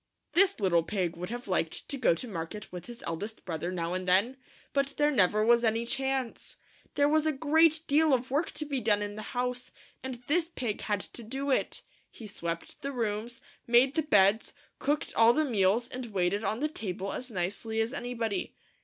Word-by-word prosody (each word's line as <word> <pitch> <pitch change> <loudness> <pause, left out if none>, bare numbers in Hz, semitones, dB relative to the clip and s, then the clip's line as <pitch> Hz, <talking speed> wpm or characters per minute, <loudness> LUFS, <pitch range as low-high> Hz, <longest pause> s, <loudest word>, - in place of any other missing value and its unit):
This 390 -2 +4
little 180 -4 +3
pig 180 -1 -2
would 180 +2 -6
have 240 0 -6
liked 165 -4 -1
to 280 - -3
go 255 -10 +3
to 250 - -6
market 195 +1 -6
with 180 -1 -8
his 240 -1 -10
eldest 205 +7 -5
brother 170 0 -3
now 170 -1 -2
and 185 0 -3
then, 200 +8 +3 0.4
but 275 0 0
there 295 0 +3
never 215 -3 +3
was 235 +1 +5
any 225 +1 +1
chance. 265 -1 -2 0.4
There 285 0 +4
was 310 +1 +3
a - - +3
great 315 +2 +3
deal 305 +2 +3
of 255 -1 +1
work 300 +4 +1
to 305 - -3
be 280 -2 -2
done 210 -2 +2
in 205 0 -4
the 215 - -6 0.2
house, 250 0 -2 0.3
and 260 -1 -4
this 330 +4 +1
pig 240 -10 -3
had 205 -2 -1
to 240 - -7
do 270 +5 -3
it. - - 0 0.3
He 225 - -11
swept 170 -5 -5
the 275 - -3
rooms, 230 -1 -3 0.3
made 245 +3 +5
the 320 - +1
beds, 205 -6 +3 0.3
cooked 295 +1 -1
all 230 +1 +6
the 310 +3 +2
meals, 220 -1 +2
and 250 -1 -6
waited 200 0 0
on 220 +4 -1
the 305 - +2
table 195 - -4
as 255 - -5
nicely 205 +3 -3
as 225 +3 0
anybody. 235 -7 -3
235 Hz, 200 wpm, -29 LUFS, 200-270 Hz, 0.4 s, all